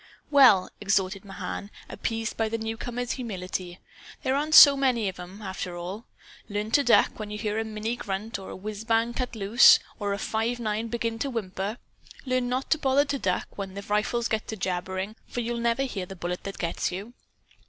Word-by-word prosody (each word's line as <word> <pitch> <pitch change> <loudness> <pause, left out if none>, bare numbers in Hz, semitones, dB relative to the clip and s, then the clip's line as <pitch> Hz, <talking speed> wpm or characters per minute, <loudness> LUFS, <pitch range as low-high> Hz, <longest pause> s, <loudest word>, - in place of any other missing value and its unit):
"Well," 255 -10 +6
exhorted 195 -1 +1
Mahan, 200 0 -6 0.2
appeased 225 0 -3
by 225 -1 0
the 230 - -1
newcomer's 235 +2 -4
humility, 185 -6 -4 0.4
"there 260 - +1
aren't 305 +2 +1
so 285 -1 +11
many 255 -6 +1
of 190 - -4
them, 185 +4 -10
after 185 -2 -5
all. 185 +6 -6 0.4
Learn 210 +1 -3
to 285 - +4
duck, 240 -2 +4
when 215 -1 -5
you 210 - -5
hear 210 0 -2
a - - 0
Minnie 220 +2 -3
grunt 200 +2 -4
or 190 - -9
a - - -7
whizzbang 225 +4 -1
cut 250 -2 -3
loose; 220 +4 +7 0.2
or 205 -1 -1
a - - -2
five 225 +3 -1
nine 220 0 -2
begin 230 0 -2
to 280 - -1
whimper. 205 -2 -3 0.5
Learn 255 -1 0
not 255 +2 -2
to 315 - +4
bother 275 +1 +3
to 280 -1 -2
duck 185 -5 -1
when 195 -1 -5
the 200 - -6
rifles 215 +3 0
get 220 0 -2
to 220 - -4
jabbering 190 +2 -3
for 245 - -3
you'll 235 0 -2
never 235 +3 +1
hear 195 -9 -4
the 195 - -8
bullet 180 0 -4
that 195 - -5
gets 170 -1 -2
you. 200 +6 -6
220 Hz, 195 wpm, -27 LUFS, 195-240 Hz, 0.5 s, so